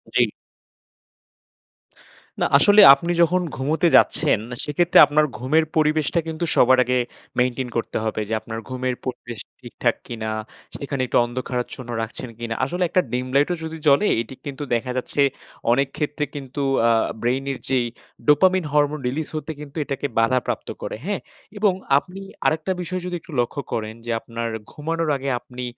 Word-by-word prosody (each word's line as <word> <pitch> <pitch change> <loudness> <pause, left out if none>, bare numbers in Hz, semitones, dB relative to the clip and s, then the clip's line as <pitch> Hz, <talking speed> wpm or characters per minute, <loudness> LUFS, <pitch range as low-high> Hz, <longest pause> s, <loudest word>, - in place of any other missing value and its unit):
জি। - - +4 2.1
না - - +4
আসলে 205 +1 +7
আপনি 170 +5 -1
যখন 175 +2 +3
ঘুমোতে 155 +6 +1
যাচ্ছেন, 150 -9 +3 0.2
সেক্ষেত্রে 170 +4 +3
আপনার 150 +1 +3
ঘুমের 150 +7 +2
পরিবেশটা 155 +1 +2
কিন্তু 160 +1 -2
সবার 130 +1 +6
আগে 125 +1 +1 0.4
মেইনটেইন 125 0 0
করতে 115 - -2
হবে। 110 -1 -2
যে - - -1
আপনার 110 0 -6
ঘুমের 130 0 -2
পরিবেশ 120 -3 -6 0.2
ঠিকঠাক - - -1
কিনা? 110 -2 -4 0.5
সেখানে 140 -1 -3
একটু - - +1
অন্ধকারাচ্ছন্ন 125 0 -4
রাখছেন 115 +2 -6
কিনা? 115 -1 -3
আসলে 180 +1 -2
একটা 185 - +3
ডিম 125 +1 -1
লাইটও 145 +6 +3
যদি 160 0 -5
জ্বলে 145 +9 +5
এটি 130 - -9
কিন্তু 140 0 -5
দেখা 125 +2 -2
যাচ্ছে 130 +3 -1 0.5
অনেক 135 +3 +3
ক্ষেত্রে 150 0 -1
কিন্তু 140 0 -5 0.3
আ - - +5 0.3
ব্রেইনের 135 +3 -1
যেই 130 -2 +2 0.4
ডোপামিন 185 +4 +4
হরমোন 150 0 +2
রিলিজ 145 +5 -2
হতে 155 +1 -4
কিন্তু 145 +1 -10
এটাকে 140 +1 -3
বাধাপ্রাপ্ত 120 +2 0
করে। - - -4
হ্যাঁ? 200 0 -2 0.4
এবং 205 -2 +3 0.2
আপনি 180 +6 -5 0.2
আরেকটা 160 +4 +1
বিষয় 185 +1 -3
যদি 180 -1 -3
একটু - - -14
লক্ষ্য 120 +4 -1
করেন 110 -1 -3
যে 120 - -3
আপনার 115 +1 -5 0.2
ঘুমানোর 165 +2 -2
আগে 135 +1 -3
আপনি 125 +1 -9
140 Hz, 155 wpm, -22 LUFS, 125-160 Hz, 2.1 s, আসলে